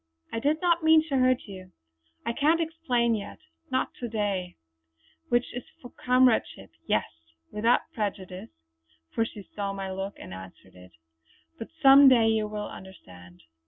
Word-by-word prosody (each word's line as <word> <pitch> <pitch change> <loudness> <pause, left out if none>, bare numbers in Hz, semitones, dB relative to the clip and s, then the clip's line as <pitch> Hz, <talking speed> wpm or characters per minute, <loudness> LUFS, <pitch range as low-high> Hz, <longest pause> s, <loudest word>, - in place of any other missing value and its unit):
I 230 - -2
did 295 +6 +1
not 340 -1 +3
mean 315 0 +6
to 275 - +1
hurt 255 -1 +2
you. 185 -2 -11 0.5
I 235 - -1
can't 305 +5 +2
explain 310 -8 0
yet; 200 - -5 0.3
not 260 - -1
to 245 - -4
day, 200 -5 -2 0.7
which 240 0 0
is 245 - -5 0.2
for 245 - -12
comradeship 250 -1 +1
only. - - -37
Yes - - +1 0.5
without 230 +3 +2
prejudice" 190 -4 -5 0.6
for 225 - 0
she 210 -2 -9
saw 200 -1 -3
my 195 -1 -5
look 195 +1 -5
and - - -10
answered 95 0 -12
it 90 0 -16 0.7
"But 225 - -6 0.2
some 275 0 +9
day 235 -3 +4
you 220 -1 +1
will 210 0 -5
understand." 90 - -13
225 Hz, 160 wpm, -27 LUFS, 190-255 Hz, 0.7 s, some